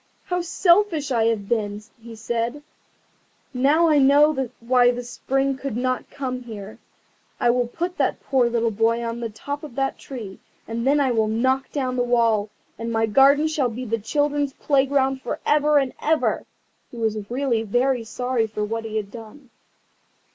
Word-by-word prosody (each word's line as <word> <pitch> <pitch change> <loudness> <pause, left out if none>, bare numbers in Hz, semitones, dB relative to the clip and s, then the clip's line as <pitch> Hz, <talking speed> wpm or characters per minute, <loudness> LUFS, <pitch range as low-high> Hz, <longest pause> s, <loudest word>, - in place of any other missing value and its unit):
"How 360 -1 -2
selfish 340 -4 +2
I 230 -3 +2
have 220 -3 0
been!" 210 -3 -1 0.2
he 230 0 -10
said; 235 +5 -3 0.9
"now 290 +6 +3
I 305 -2 +4
know 280 -1 +4
why 245 +1 +4
the 245 0 -2
Spring 270 +2 -1
would 275 -5 -3
not 255 0 -2
come 255 -2 -4
here. 215 -4 -9 0.6
I 240 - +4
will 245 0 0
put 350 +8 -4
that - - +1
poor 255 -3 +1
little 230 -1 0
boy 225 +2 +1
on 230 0 -4
the 230 -1 -3
top 285 +7 -6
of 290 -6 -9
the 270 0 0
tree, 220 -8 -9 0.3
and 230 +2 -3
then 290 +2 +4
I 270 -3 +2
will 220 -2 +1
knock 260 +5 0
down 255 -3 -2
the - - +2
wall, 230 -4 +2 0.3
and 230 0 -3
my 225 0 +2
garden 275 +7 +5
shall 300 -5 0
be 245 +3 -6
the 230 0 -1
children's 290 +4 0
playground 270 -1 +1
for 240 - -4
ever 300 0 +3
and 270 -3 +1
ever." 315 0 0 0.4
He 240 - -12
was 215 -2 -2
really 245 -2 0
very 245 +3 +1
sorry 245 0 -1
for 210 -1 -3
what 225 +1 -4
he 220 0 -3
had 205 -2 -4
done. 235 +3 -12
245 Hz, 175 wpm, -23 LUFS, 230-275 Hz, 0.9 s, garden